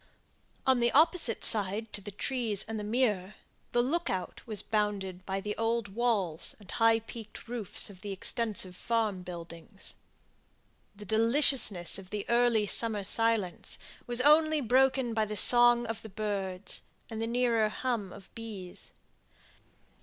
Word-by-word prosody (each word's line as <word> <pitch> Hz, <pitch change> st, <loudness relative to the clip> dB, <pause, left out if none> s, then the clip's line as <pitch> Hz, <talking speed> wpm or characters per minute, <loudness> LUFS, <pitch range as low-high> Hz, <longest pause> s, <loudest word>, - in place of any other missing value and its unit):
On 260 Hz, -2 st, +3 dB
the 235 Hz, 0 st, +2 dB
opposite 310 Hz, -, +3 dB
side 210 Hz, +1 st, +2 dB
to 205 Hz, -, -3 dB
the 205 Hz, -, -7 dB
trees 220 Hz, 0 st, -1 dB
and 220 Hz, -1 st, -4 dB
the -, -, -5 dB
mere, 210 Hz, -4 st, 0 dB, 0.4 s
the 240 Hz, -, +2 dB
look 335 Hz, +7 st, -1 dB
out 185 Hz, -1 st, -4 dB
was 215 Hz, -3 st, -1 dB
bounded 200 Hz, -4 st, -2 dB
by 195 Hz, 0 st, -2 dB
the 210 Hz, +1 st, -4 dB
old 225 Hz, -1 st, -1 dB
walls 200 Hz, -7 st, -1 dB
and 205 Hz, -, -13 dB
high 225 Hz, 0 st, +3 dB
peaked 225 Hz, 0 st, -10 dB
roofs 230 Hz, -5 st, -3 dB
of 190 Hz, -3 st, -9 dB
the 205 Hz, -, -6 dB
extensive 195 Hz, -1 st, -1 dB
farm 220 Hz, -3 st, -1 dB
buildings. 170 Hz, +2 st, -8 dB, 1.0 s
The 210 Hz, +1 st, -11 dB
deliciousness 225 Hz, -, +4 dB
of 185 Hz, -1 st, -12 dB
the 205 Hz, 0 st, -4 dB
early 235 Hz, -2 st, +3 dB
summer 215 Hz, 0 st, +4 dB
silence 220 Hz, -3 st, 0 dB, 0.3 s
was 240 Hz, 0 st, +1 dB
only 310 Hz, +2 st, +4 dB
broken 260 Hz, -1 st, +2 dB
by 220 Hz, -1 st, +1 dB
the 210 Hz, 0 st, -6 dB
song 240 Hz, +1 st, +5 dB
of 225 Hz, -1 st, -5 dB
the 220 Hz, -, -10 dB
birds, 200 Hz, -2 st, -3 dB, 0.3 s
and 225 Hz, 0 st, -6 dB
the 225 Hz, -, -1 dB
nearer 235 Hz, -2 st, +1 dB
hum 220 Hz, -4 st, -3 dB
of 195 Hz, -1 st, -14 dB
bees. 205 Hz, -6 st, -9 dB
220 Hz, 150 wpm, -30 LUFS, 200-240 Hz, 1.0 s, song